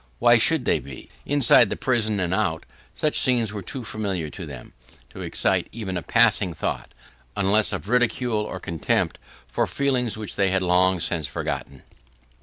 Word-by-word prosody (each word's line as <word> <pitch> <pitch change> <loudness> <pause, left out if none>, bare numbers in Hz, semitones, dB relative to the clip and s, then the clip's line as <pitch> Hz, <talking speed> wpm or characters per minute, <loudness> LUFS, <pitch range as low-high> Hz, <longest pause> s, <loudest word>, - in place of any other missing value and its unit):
Why 120 - +5
should 150 +2 +2
they - - +2
be? 65 0 -11 0.2
Inside 145 -4 +5
the - - -2
prison, 110 -5 0
and 90 -1 -1
out, 95 -6 -1 0.3
such 155 - +1
scenes 120 -5 +2
were 105 - -5
too 125 +7 -6
familiar 95 -8 -3
to 95 -5 -8
them, 70 -4 -10 0.4
to - - -9
excite - - 0
even 105 -5 -5
a 90 - -2
passing 105 -4 +2
thought, - - -4 0.4
unless 100 +2 +3
of 95 -1 -5
ridicule 120 -1 +1
or 100 -3 -5
contempt 85 -3 -1 0.3
for - - -1
feelings 125 -5 0
which 105 -2 -6
they 100 -1 +2
had 95 0 0
long 90 +1 +3
since 80 -3 -1
forgotten. 65 0 -5
105 Hz, 170 wpm, -24 LUFS, 90-120 Hz, 0.4 s, Why